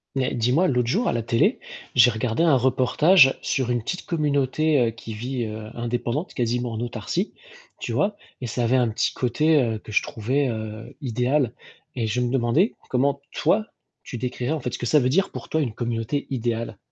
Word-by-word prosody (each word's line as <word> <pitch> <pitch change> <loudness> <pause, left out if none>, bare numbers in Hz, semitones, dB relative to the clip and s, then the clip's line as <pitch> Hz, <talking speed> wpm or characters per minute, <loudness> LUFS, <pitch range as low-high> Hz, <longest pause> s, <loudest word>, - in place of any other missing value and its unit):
Mais, 130 -1 0
dis-moi, 125 +10 +2
l'autre 125 -5 +1
jour 225 - +1
à - - +1
la 115 - 0
télé, 115 +1 +2 0.3
j'ai 125 0 +7
regardé 115 +3 -1
un 160 -4 +5
reportage 135 +5 +4
sur 130 -2 0
une 120 -1 +1
petite 180 - -4
communauté 145 -4 +1
qui 115 -1 -7
vit 120 +2 -3 0.3
indépendante, 120 +7 -2
quasiment 120 -1 -1
en 110 - -4
autarcie, 120 - -3 0.5
tu - - -4
vois, 205 0 +1 0.2
et 125 - -3
ça 120 +1 -2
avait 120 +2 +2
un 125 -3 +3
petit 110 - 0
côté 125 -2 +2
que - - -10
je - - +3
trouvais 130 +5 -1 0.5
idéal. 125 0 0 0.4
Et 115 -3 -1
je 120 +3 0
me 120 -1 0
demandais 135 - +2
comment 140 +2 +1
toi, 210 +7 +1 0.4
tu 125 - -6
décrirais 125 +3 -3
en 160 - -2
fait 125 -2 -4
ce - - -4
que 120 - -3
ça 150 +6 +5
veut 125 - +1
dire 190 +9 +2
pour - - -8
toi 160 - 0
une 125 -7 -2
communauté 120 +4 -2
idéale? 115 -2 -2
125 Hz, 190 wpm, -24 LUFS, 120-145 Hz, 0.5 s, j'ai